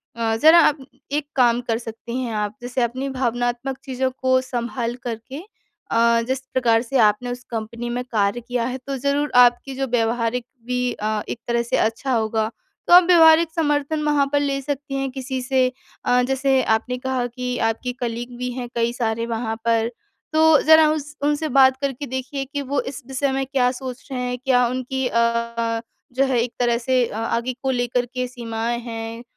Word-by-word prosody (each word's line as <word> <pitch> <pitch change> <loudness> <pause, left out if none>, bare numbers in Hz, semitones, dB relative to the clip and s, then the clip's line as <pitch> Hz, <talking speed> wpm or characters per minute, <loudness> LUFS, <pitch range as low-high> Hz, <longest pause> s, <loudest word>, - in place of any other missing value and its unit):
अ, 225 -1 0
ज़रा 315 +8 +7
आप 285 -4 +2 0.3
एक 295 0 -1
काम 245 -2 +3
कर 225 - +1
सकती 230 +1 -7
हैं 240 -3 -3
आप 210 0 -2
जैसे 245 +1 -2
अपनी 255 +3 -1
भावनात्मक 245 0 -2
चीज़ों 260 0 -1
को 260 0 +3
सँभाल 240 -1 -3
कर 235 -2 -2
के 260 +6 -10 0.5
अ, 230 0 +4
जिस 260 0 -1
प्रकार 235 -3 +3
से 255 +3 -2
आपने 210 +4 -1
उस 245 +1 -7
कंपनी 230 +1 -5
में 245 +1 -2
कार्य 205 +2 +1
किया 240 0 -2
है 255 +1 -3
तो 275 - -2
ज़रूर 285 +3 0
आपकी 250 +2 +4
जो 270 0 -2
व्यावहारिक 235 0 0 0.2
भी 250 0 -1
अ, 215 0 -2
एक - - -4
तरह 235 0 +1
से 235 - 0
अच्छा 230 +5 0
होगा। 220 -1 0 0.4
तो - - +5
आप 360 +1 +10
व्यावहारिक 325 -2 +6
समर्थन 295 -1 0
वहाँ 295 -2 +3
पर 290 - +3
ले 280 -1 0
सकती 280 0 -4
हैं 270 0 -1
किसी 260 0 -4
से 260 0 +2 0.4
अ, 250 0 +4
जैसे 265 0 +2
आपने 230 +3 0
कहा 255 -1 -2
कि 250 +1 -4
आपके 225 +2 -1
कलीग 240 0 -4
भी 250 0 -3
हैं 245 0 -5
कई 235 0 +1
सारे 230 -1 -1
वहाँ 225 -1 -3
पर, 230 0 +2 0.4
तो 315 -1 +6
ज़रा 315 0 +6
उस 305 0 -4
उनसे 295 +2 +1
बात 260 0 +6
करके 280 0 -2
देखिए 260 +2 -4
कि 285 +1 -4
वो 280 +1 -1
इस 265 +1 -7
विषय 270 +1 -1
में 270 0 -1
क्या 260 -2 +1
सोच 255 0 -8
रहे 255 - -2
हैं? 250 0 -2
क्या 250 -2 +4
उनकी 255 +1 -2
अ - - -7
अ, 235 -1 0 0.3
जो 265 +2 +2
है 255 -2 +1
एक 240 - -5
तरह 240 -1 +2
से 250 +1 +1
अ, - - -8
आगे 230 +2 -1
को 265 - +1
लेकर 245 0 0
के 255 -1 -2
सीमाएँ 235 -1 -3
हैं? 230 0 -6
250 Hz, 195 wpm, -22 LUFS, 235-270 Hz, 0.5 s, आप